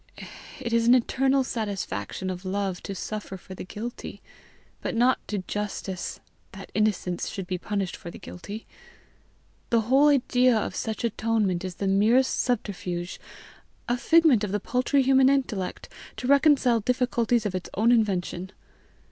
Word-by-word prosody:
It 235 -3 -4
is 230 0 +3
an 245 - +8
eternal 265 +2 +2
satisfaction 205 -4 -4
to 180 +2 -9
love 195 -2 -2
to 195 - -6
suffer 205 0 -5
for 185 - -11
the - - -7
guilty, 220 +6 -7 0.6
but - - -3
not 245 +3 +3
to 210 - -2
justice 200 -3 -4 0.3
that - - -10
innocence 210 -4 0
should 195 - -5
be 180 0 -3
punished 200 -1 -2
for 170 - -9
the - - -10
guilty. 205 +5 -8 1.0
The 230 -1 +3
whole 265 +6 +4
idea 255 -3 +4
of 215 - -2
such 220 0 -3
atonement 220 -5 0
is 185 -2 -5
the 200 - -3
merest 215 +7 +3
subterfuge, 185 -7 -2 0.7
a 240 - +1
figment 305 -3 +4
of 205 - -2
the 205 - 0
paltry 255 +5 +1
human 265 0 +5
intellect 250 -9 -1 0.3
to - - -5
reconcile 275 -3 +4
difficulties 240 0 +1
of 205 - -1
its 185 -1 -4
own 225 +4 +3
invention. 190 -5 0
220 Hz, 150 wpm, -26 LUFS, 195-250 Hz, 1.0 s, an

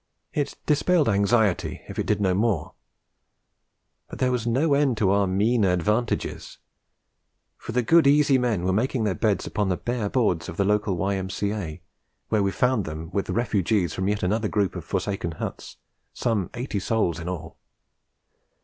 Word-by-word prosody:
It 145 -2 -2
dispelled 155 +1 +2
anxiety, 100 -1 +1
if - - -6
it - - -1
did - - +1
no 95 -2 +2
more. 100 -4 0 1.4
But - - -8
there 130 -1 +1
was 120 -2 -1
no 140 +6 +2
end 140 -4 +2
to 100 -3 +2
our 100 0 +3
mean 105 +5 +2
advantages; 105 +6 -1 1.0
for - - -8
the 125 +1 +1
good 165 +3 +5
easy 140 -2 +4
men 115 -8 0
were 95 +1 +1
making 120 +3 0
their 105 -3 +1
beds 105 0 0
upon 105 -2 -1
the 90 - 0
bare 120 -4 -2
boards 100 -11 0
of 85 - -8
the 100 - +2
local 105 -2 +1
Y.M.C.A., 95 -2 -2 0.5
where 110 - +2
we 100 - +2
found 125 -2 +1
them 80 +1 -6
with 100 - -1
the - - -2
refugees 105 -5 +1
from 95 +1 -2
yet 105 0 -1
another 105 +4 +1
group 100 -3 0
of 90 - -5
forsaken 95 -2 -2
huts, - - -7 0.4
some 110 -6 -1
eighty 120 -4 -3
souls 95 -5 0
in 85 +1 -5
all. 85 -2 -7
105 Hz, 170 wpm, -25 LUFS, 95-120 Hz, 1.4 s, good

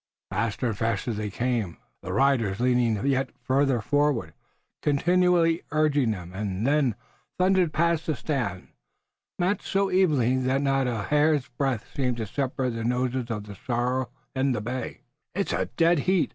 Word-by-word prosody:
Faster 105 +5 -1
and 110 - -2
faster 115 +1 0
they 105 0 -3
came, 115 -5 -2 0.2
their - - -5
riders 120 -8 +2
leaning 120 -3 +2
yet 135 -1 +1
farther 135 -2 +2
forward, 145 - +1 0.5
continually 170 +2 +3
urging 150 -4 +2
them, 90 -4 -4
and 100 +1 -3
they 140 -5 +2 0.4
thundered 185 -2 +3
past 170 +1 +1
the 155 - +1
stand, 120 - -3 0.7
matched 185 +3 0
so 195 0 +1
evenly 145 -10 +3
that 130 +2 +1
not 135 -1 +2
a 115 -4 -2
hair's 150 -1 +2
breadth 125 -2 -1
seemed 125 -3 0
to 110 - -2
separate 130 +3 -2
the 115 -1 -4
noses 125 +1 -1
of 105 -3 -3
the 105 -1 -9
sorrel 125 +4 -1 0.2
and 130 -1 +1
the - - -2
bay. 125 +4 -5 0.3
"It's 200 +1 -1
a - - 0
dead 170 -1 +4
heat!" 185 +3 +2
130 Hz, 160 wpm, -26 LUFS, 115-150 Hz, 0.7 s, dead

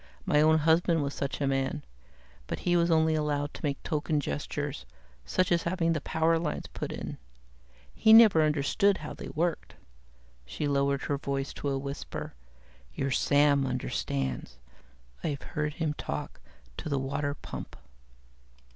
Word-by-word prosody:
My 150 - +4
own 160 +1 +5
husband 160 +1 +3
was 140 0 -3
such 140 -1 -3
a 145 - 0
man, 135 +1 -1 0.6
but - - -4
he 175 - +2
was 170 0 +3
only 160 -1 +4
allowed 145 -1 -1
to - - -9
make 140 -2 -2
token 150 0 0
gestures, 70 - -4 0.4
such 185 -1 +1
as 170 -1 +4
having 170 -1 +1
the 155 - -2
power 165 +2 +2
lines 160 -3 -3
put - - -4
in. - - -6 0.7
He 220 - +4
never 220 -7 +9
understood 155 +7 +2
how - - -5
they - - -8
worked." 170 +2 -2 0.7
She 65 - -3
lowered 140 -1 +1
her 145 -2 -1
voice 140 -1 -3
to 145 - -3
a 135 - 0
whisper, 140 +1 -6 0.6
"Your 135 - -1
Sam 145 +1 +3
understands. 70 - -3 0.7
I've 140 -2 -2
heard 150 0 -3
him 160 -3 -1
talk 105 - -5 0.4
to - - -5
the 140 - +1
water 140 +2 -2
pump." - - -8
150 Hz, 155 wpm, -29 LUFS, 140-160 Hz, 0.7 s, never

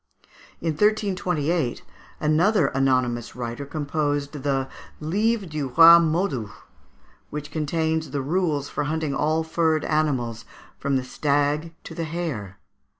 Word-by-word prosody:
In 165 - -1
1328 180 - 0 0.4
another 160 +2 +3
anonymous 130 -3 0
writer 120 +3 -5
composed 145 -1 -1
the 135 -1 0 0.3
"Livre 205 +7 0
du 155 -4 -3
Roy 165 +6 +9
Modus," 155 - 0 0.8
which 150 0 -6
contains 160 +1 -1
the 140 0 -3
rules 155 -2 0
for 150 - -3
hunting 155 -1 -1
all 155 +3 +1
furred 160 -1 +1
animals, 130 -7 0 0.4
from 140 -1 0
the 130 - 0
stag 145 +4 0
to - - -9
the 165 - -3
hare. 150 - -4
150 Hz, 120 wpm, -24 LUFS, 140-165 Hz, 0.8 s, Roy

